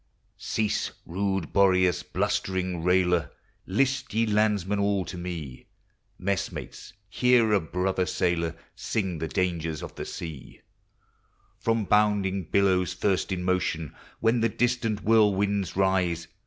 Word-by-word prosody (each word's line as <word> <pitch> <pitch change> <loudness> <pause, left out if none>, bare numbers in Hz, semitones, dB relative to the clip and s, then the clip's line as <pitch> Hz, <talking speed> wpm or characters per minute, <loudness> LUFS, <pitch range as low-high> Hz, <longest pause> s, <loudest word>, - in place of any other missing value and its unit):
Cease, 110 -1 -1 0.2
rude 95 -1 -2
Boreas, 95 -3 +4
blustering 90 -3 -2
railer! 90 -3 +2 0.4
List, 130 +4 0
ye 115 +1 +3
landsmen, 105 -2 +1
all 100 -2 +1
to - - -7
me, 85 -7 -6 0.5
Messmates, 100 +1 -4
hear 120 +2 +3
a 100 - +5
brother 90 +3 -1
sailor 85 -2 0 0.2
Siug 95 -7 -2
the 80 - -2
dangers 80 0 -2
of - - -7
the - - -6
sea; 80 -6 -8 1.0
From 115 -2 0
bounding 100 -3 +2
billows, 90 +1 +2
first 95 +1 0
in 90 -1 -2
motion, 90 -4 -1 0.3
When 115 +2 +2
the 115 - +3
distant 115 -2 0
whirlwinds 100 -3 +2
rise. 90 -3 +1
95 Hz, 120 wpm, -27 LUFS, 90-105 Hz, 1.0 s, a